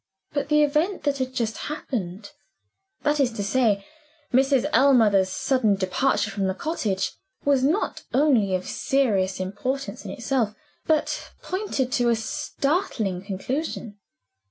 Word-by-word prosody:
But 285 -1 -2
the 300 0 +5
event 305 +7 0
which 280 -1 +1
had 260 0 -1
just 230 -4 -2
happened 205 - -4 0.7
that 295 0 +2
is 260 -3 +3
to 205 - -3
say, 205 -3 +2 0.5
Mrs. 265 0 +4
Ellmother's 220 -8 +5
sudden 220 0 +2
departure 205 +3 +1
from 195 -1 -1
the 190 - -1
cottage 205 - -1 0.3
was 280 -2 +3
not 320 +10 +1
only 250 -9 +3
of 185 - -3
serious 210 -10 +1
importance 220 +4 -3
in - - -7
itself, 235 -3 -1 0.3
but 310 -1 0
pointed 365 -10 -2
to 245 -1 +2
a 235 - +4
startling 225 - -1
conclusion. 210 +2 -4
250 Hz, 130 wpm, -25 LUFS, 200-280 Hz, 0.7 s, the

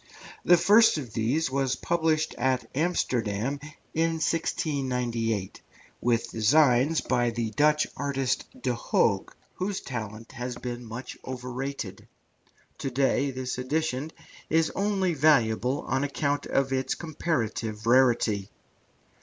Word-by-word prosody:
The 175 - +6
first 210 +3 +6
of 125 -7 -6
these 130 +7 0
was 135 -1 +1
published 160 -2 0
at 130 -1 +1
Amsterdam 130 - 0 0.3
in 165 +1 +1
1698, 125 - -1 0.4
with 120 -1 +1
designs 135 +5 +4
by 120 -2 +1
the 115 -1 -2
Dutch 150 +6 +3
artist, 135 -3 -1
Roman - - -18
de 125 - +1
Hooge, - - +1 0.3
whose 190 +1 -2
talent 115 -3 -6
has 125 +1 -5
been 125 -1 -5
much 120 +3 -7
overrated. 125 -4 -5 0.7
To 135 - -2
day 135 +2 +1
this 130 -1 -4
edition 150 +2 -1 0.4
is 160 0 +2
only 195 -3 0
valuable 130 -4 +3
on 130 +1 -1
account 145 0 -1
of 135 -1 +1
its 130 0 0
comparative 120 -9 -3
rarity. 115 -5 +3
130 Hz, 120 wpm, -27 LUFS, 120-155 Hz, 0.7 s, The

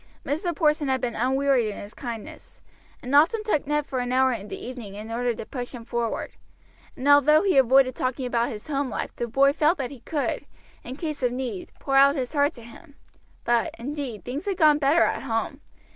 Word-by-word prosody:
Mr. 330 +4 -2
Porson 300 -2 +2
had 265 -1 +1
been 240 -2 -2
unwearied 265 0 +2
in 210 - -5
his 205 +1 -9
kindnesses, 235 -5 -8 0.4
and 250 +2 -5
often 330 +10 +4
took 365 -11 0
Ned 295 0 0
for 260 -3 -3
an 245 0 -2
hour 260 0 +3
in 210 -3 -6
the - - -6
evening 235 -6 -8
in 215 +2 -8
order 240 0 -1
to - - -7
push 245 +1 -6
him 235 -2 -9
forward, 235 -1 -3 0.7
and 265 - -3
although 290 +3 +6
he 390 -2 +2
avoided 265 0 +5
talking 255 +1 -2
about 240 0 0
his 215 -5 -8
home 280 -2 -1
life - - -5
the 240 - -2
boy 275 +4 +3
felt 320 +3 +2
that 265 -3 -4
he 275 - -10
could, 290 +4 -3 0.4
in 255 - -7
case 305 -1 -5
of 250 -1 +1
need, 245 -7 -5
pour 270 0 0
out 280 +1 +6
his 255 -1 -3
heart 290 +1 +2
to 235 - -13
him; 285 +6 -15 0.5
but, 235 -1 +1
indeed, 265 -3 -5
things 275 +8 -5
had 390 -3 -1
gone 305 -4 +5
better 295 +4 +4
at - - 0
home. 265 +3 -3
265 Hz, 215 wpm, -25 LUFS, 240-290 Hz, 0.7 s, although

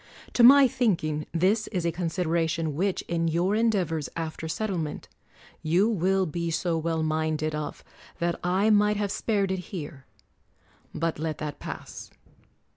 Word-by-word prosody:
To - - +2
my 270 +3 +9
thinking, 175 - 0
this 190 +6 +1
is 180 -5 -3
a 170 - +2
consideration 165 -2 -1
which, 190 +5 -1
in 165 -1 -1
your 170 +4 +1
endeavors 195 -9 0
after 160 0 -4
settlement, 165 -3 -3 0.5
you 175 +7 +3
will 190 -2 +1
be 170 +1 -3
so 165 +1 0
well 160 0 -1
minded 155 0 -1
of 150 -1 -5 0.3
that 170 0 -1
I 190 +5 +2
might 210 0 +4
have 205 -1 -1
spared 200 -4 0
it 190 - -1
here: 145 -7 -7 0.8
but 165 -1 -2
let 155 -1 -2
that 150 -2 -5
pass. - - -8
170 Hz, 145 wpm, -27 LUFS, 160-200 Hz, 0.8 s, my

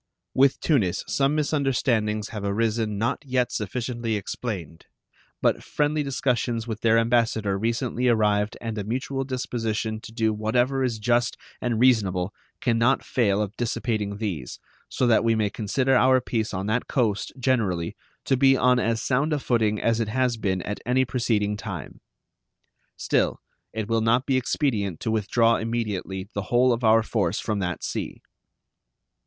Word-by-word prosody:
With 135 +1 +4
Tunis 110 - +1
some 140 +2 +1
misunderstandings 130 -8 0
have 105 -3 -6
arisen 105 +1 0
not 115 +3 -1
yet 125 -3 0
sufficiently 115 +1 -3
explained, 95 -6 -5 0.6
but - - +2
friendly 150 +1 0
discussions 125 -4 -1
with 110 -1 -5
their 115 0 +4
ambassador 115 -3 +2
recently 120 +4 -1
arrived 105 -2 +2
and 115 -2 -4
a - - -2
mutual 130 +5 -2
disposition 115 -4 -3
to - - -10
do 110 -1 +1
whatever 120 +5 +1
is 120 -3 -1
just 120 +2 +1 0.2
and 120 -3 -1
reasonable 100 -7 +2 0.3
can 115 -2 +1
not 125 +4 +2
fail 105 -4 +1
of 105 +1 -6
dissipating 110 -3 -2
these, 90 - -4 0.3
so 130 - 0
that 115 -2 +4
we 115 0 +3
may 105 -2 0
consider 130 +5 +1
our 130 +1 +5
peace 115 -3 -2
on 95 0 -3
that 110 +4 -1
coast, 110 -7 0
generally, 110 -10 0 0.3
to 135 - +2
be 135 0 +5
on 125 0 +4
as 115 -1 0
sound 140 +4 +1
a - - +2
footing 110 -6 +1
as 115 0 +1
it 115 - 0
has 125 +2 +1
been 95 -4 -1
at 105 - -4
any 130 +2 +2
preceding 110 -5 0
time. 95 - -7 1.0
Still, - - 0 0.3
it 110 -1 -4
will 115 0 +1
not 120 +3 +2
be 135 - +1
expedient 120 - 0
to 110 - -1
withdraw 115 +2 +2
immediately 105 -5 -3
the 100 - -2
whole 125 +1 +4
of 120 +1 -4
our 110 0 +5
force 100 -5 0
from 105 -2 -2
that 90 -2 -3
sea. - - -4
115 Hz, 160 wpm, -25 LUFS, 105-125 Hz, 1.0 s, our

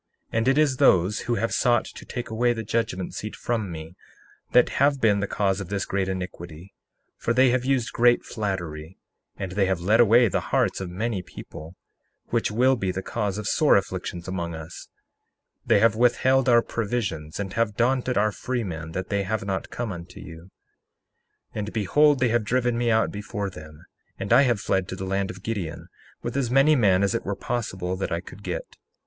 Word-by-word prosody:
61:4 - - 0
And 115 - -1
it 135 +2 +4
is 145 -4 +3
those 95 0 +4
who 120 - -1
have 115 +1 -1
sought 120 -2 +2
to - - -11
take 120 -2 -6
away 120 +2 +2
the 115 -1 -5
judgment 110 -4 -2
seat 105 - -6
from 110 -6 -2
me 80 +1 -8 0.6
that 125 - +5
have 140 0 +4
been 105 -4 +3
the 100 - -1
cause 95 -1 0
of 95 - -7
this 100 -2 -2
great 95 -1 -1
iniquity; 90 -1 -7 0.4
for 115 - -1
they 130 -1 +5
have 125 0 +1
used 130 -3 0
great 120 0 +3
flattery, 90 -6 -4 0.4
and 95 -2 -4
they 95 0 +1
have 95 -2 0
led 105 +6 +2
away 120 +1 +6
the 95 - 0
hearts - - +1
of 95 - -4
many 100 +2 -2
people, 80 -1 -11 0.5
which 115 -1 0
will 125 +5 +3
be 95 -6 -2
the 95 +1 -5
cause 105 -4 -2
of 105 - -5
sore 150 +7 +4
affliction 90 -2 -4
among 85 -3 -4
us; 80 0 -9 0.8
they - - +5
have 110 +1 +4
withheld 130 +2 +3
our 120 -1 +5
provisions, 100 -10 -3
and 95 -2 -4
have 115 -2 0
daunted 125 +1 +1
our 105 +1 +3
freemen 95 -11 -4
that 95 +1 -4
they 100 -1 0
have 100 +1 -2
not 95 -1 -3
come 120 -3 -4
unto 85 0 -9
you. 80 0 -10 1.1
61:5 - - -8
And 105 +1 -4
behold, 145 +7 +3
they 125 -1 +2
have 120 0 +1
driven 125 +2 +1
me 120 0 0
out 110 0 +2
before 105 -1 -4
them, 75 -2 -12 0.3
and - - 0
I 130 - +7
have 120 -4 +1
fled 95 0 0
to 95 - -5
the 95 0 -5
land 95 0 -1
of 95 +1 -9
Gideon, 85 -6 -4 0.3
with - - -4
as 135 -4 0
many 135 +4 +5
men 100 -6 +3
as 100 - +1
it 115 0 -2
were 100 - -3
possible 95 -7 -3
that 95 - -3
I 85 - 0
could 95 - -12
get. - - -6
105 Hz, 205 wpm, -25 LUFS, 95-120 Hz, 1.1 s, I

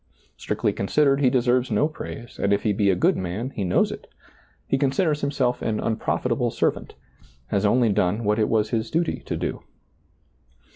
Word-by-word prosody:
Strictly - - -1
considered, 140 +7 +2
he 130 - +5
deserves 125 0 +2
no 115 +7 +2
praise, 120 - -9
and 100 - +1
if 100 - +1
he 105 - +2
be 100 0 +2
a 95 - +3
good 90 - +2
man 95 +8 -4
he 105 - -4
knows 90 - +2
it; - - -9 0.6
he - - 0
considers 145 +3 +1
himself 130 -3 0
an 110 -1 -1
unprofitable 110 - -1
servant; - - -2 0.5
has 100 +1 +1
only 120 +2 +3
done 100 +2 +1
what 105 +1 +1
it 110 - +2
was 110 -1 +1
his 110 -1 -1
duty 165 +1 -1
to - - -2
do. - - -3
115 Hz, 180 wpm, -24 LUFS, 105-135 Hz, 0.6 s, he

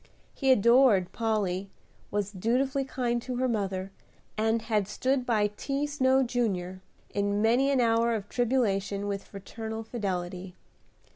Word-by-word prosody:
He 270 -2 +2
adored 235 -5 +5
Polly, 200 -4 -1 0.4
was 205 -1 -2
dutifully 255 +7 0
kind 240 -2 -1
to 250 +1 -5
her 255 +1 +1
mother, 195 -4 -2 0.4
and 220 +1 +1
had 210 -4 0
stood 255 +4 -1
by 210 -3 +2
T. 280 +1 -1
Snow, 265 -2 +2
Jr., 190 -7 -2 0.3
in 205 0 0
many 240 +5 +3
an 275 -2 +2
hour 230 0 +3
of 205 -2 -5
tribulation 205 -5 0
with 200 -1 -3
fraternal 220 +3 -7
fidelity. 185 -5 -4
220 Hz, 135 wpm, -28 LUFS, 200-250 Hz, 0.4 s, adored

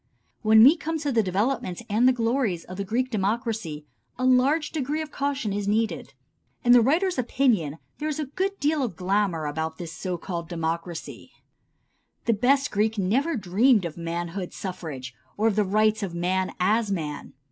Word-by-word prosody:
When 220 0 +7
we 280 +7 +8
come 320 +1 -3
to 290 -2 -1
the 230 -3 +3
development 210 +1 -1
and 220 +4 +3
the - - +7
glories 230 -7 0
of 185 - -9
the 200 - -2
Greek 250 +6 -1
democracy 210 - -2 0.3
a 255 - -1
large 265 +5 +3
degree 300 0 -2
of 305 - -10
caution 275 -8 -2
is 200 0 -2
needed. 220 +2 -1 0.5
In 245 - +4
the 245 -1 +8
writer's 325 - +2
opinion 225 - +1 0.2
there 305 +1 -2
is 300 - -3
a 305 - -1
good 385 +8 -3
deal 300 +1 +1
of 235 -9 -2
glamour 185 -3 0
about 160 +2 -3
this 170 -2 -7
so 180 0 -4
called 170 -1 -5
democracy. 165 0 -4 0.9
The 230 - +3
best 270 +6 +2
Greek 215 +2 +1
never 250 - +1
dreamed 205 +2 +3
of 165 - -5
manhood 170 +2 -4
suffrage, 150 -9 -6 0.2
or 220 +2 +3
the 210 +1 +2
rights 215 +2 +2
of 185 -4 -4
man 185 +2 0
as 210 +3 +2
man. 150 -6 -4
215 Hz, 175 wpm, -25 LUFS, 180-255 Hz, 0.9 s, we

